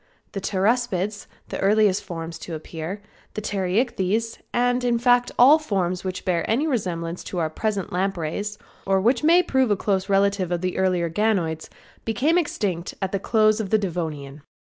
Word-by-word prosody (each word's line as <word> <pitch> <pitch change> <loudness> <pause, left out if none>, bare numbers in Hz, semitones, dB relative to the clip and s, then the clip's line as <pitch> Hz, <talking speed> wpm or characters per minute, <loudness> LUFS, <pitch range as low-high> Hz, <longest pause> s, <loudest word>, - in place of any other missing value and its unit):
The 195 - -5
Pteraspids, 205 0 0 0.2
the - - -4
earliest 205 -1 +3
forms 165 -2 -6
to 165 - -6
appear; 165 +5 -6 0.3
the 215 - -3
Pterichthys, 215 +2 -1
in 245 0 +1
fact, 245 +1 +3
all 280 +6 +7
forms 185 - -1
which 185 -1 -5
bear 170 -3 +1
any 245 +8 +2
resemblance 180 - -2
to 185 - -5
our 160 -2 0
present 200 0 -2
lampreys, 195 +2 -2 0.3
or 195 0 +3
which 235 +5 +2
may 340 +3 +6
prove 265 -6 +1
a 205 - +2
close 195 0 -1
relative 195 -2 +2
of 175 -1 -1
the 185 0 -2
earlier 180 -2 +1
ganoids, 170 -4 0 0.3
became 280 - +2
extinct 195 - -2
at 190 0 -2
close 215 -1 +3
of 210 -3 -3
the 220 - +4
Devonian. 160 -7 -4
195 Hz, 160 wpm, -23 LUFS, 180-225 Hz, 0.3 s, all